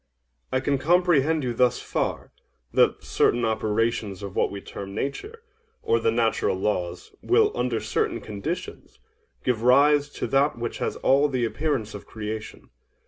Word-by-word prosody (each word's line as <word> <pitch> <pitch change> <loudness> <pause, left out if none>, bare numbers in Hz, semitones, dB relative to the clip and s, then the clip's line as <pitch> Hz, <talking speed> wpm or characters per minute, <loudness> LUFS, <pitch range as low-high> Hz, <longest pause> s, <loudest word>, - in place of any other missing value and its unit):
OINOS. 130 - +2
I - - +2
can 140 0 +1
comprehend 160 -1 +3
you 125 -2 -1
thus 125 +1 +2
far—that - - -2
certain 120 0 +2
operations 110 -2 -1
of 100 -1 -7
what - - +2
we 100 - -6
term 100 0 -8
Nature, 415 - -5 0.4
or 115 - +2
the 115 - +1
natural 115 -4 +1
laws, 90 -3 -2
will, 425 +2 +3
under - - 0
certain 440 0 -1
conditions, - - -6 0.5
give 125 -4 0
rise 145 +4 +5
to - - -3
that 140 -1 +2
which 120 0 -4
has - - -2
all 140 +2 +3
the 130 -3 0
appearance 130 -4 -2
of 105 - -9
creation. 110 0 -7
120 Hz, 150 wpm, -25 LUFS, 110-145 Hz, 0.5 s, rise